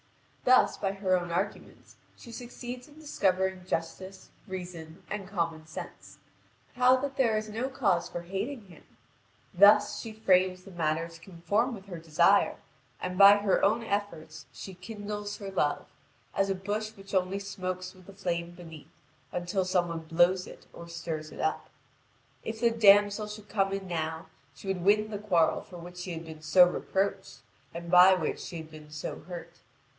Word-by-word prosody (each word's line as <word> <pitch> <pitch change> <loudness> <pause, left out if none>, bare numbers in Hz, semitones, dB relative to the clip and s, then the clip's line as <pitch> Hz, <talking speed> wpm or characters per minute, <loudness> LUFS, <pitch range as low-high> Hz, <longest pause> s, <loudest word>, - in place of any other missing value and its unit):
Thus, 255 0 +5
by 195 -1 -1
her 195 -2 +1
own 175 -1 -2
arguments 170 - -4 0.2
she 235 - -12
succeeds 245 +1 -8
in 295 0 -18
discovering 190 -10 0
justice, 185 +3 -4 0.2
reason, 180 -2 -8
and 200 -2 -4
common 165 -5 -3
sense, 160 - -9 0.6
how 250 +1 +5
that 275 +1 -4
there 235 -6 +2
is 215 0 -3
no 225 +5 -3
cause 200 -10 +1
for 175 - -5
hating 205 +7 -4
him; 175 -4 -16 0.7
thus 205 +2 +6
she 225 - -7
frames 185 -4 +2
the 195 - -12
matter 165 -1 -1
to 165 -1 -14
conform 200 +8 -1
with 195 -2 -12
her 180 -4 -7
desire, 160 -2 +3 0.4
and 180 0 -4
by 200 +1 +10
her 205 -1 +1
own 225 +4 +3
efforts 200 -7 -4
she 190 - -9
kindles 205 +2 -6
her 200 -2 -7
love, 145 -6 0 0.5
as 195 0 +1
a 195 - +1
bush 205 +3 -3
which 195 +1 -12
only 190 +1 +1
smokes 185 -2 -5
with 185 -1 -18
the 200 - -11
flame 175 -3 -3
beneath, 165 -3 -12 0.4
until 180 +2 -1
some 180 -1 +1
one 165 -1 -4
blows 175 +3 +2
it - - -13
or 170 - -10
stirs 160 -2 -5
it - - -11
up. - - -1 0.7
If 225 0 -5
the 235 0 +3
damsel 205 -1 +5
should 210 0 -9
come 195 -2 +1
in 195 -1 -4
now, 160 -2 -3 0.3
she - - -12
would 190 -2 -1
win 210 +2 +3
the 205 - -4
quarrel 175 -6 +2
for 180 - -12
which 175 +1 -10
she 180 0 -5
had 165 0 -6
been 160 -1 -10
so 175 +3 +6
reproached, 185 -7 -2 0.3
and 170 0 -7
by 180 +1 +8
which 160 -4 -2
she 170 - -7
had 160 -1 -9
been 155 -1 -12
so 150 0 -6
hurt. 170 -1 -9
190 Hz, 175 wpm, -29 LUFS, 170-205 Hz, 0.7 s, by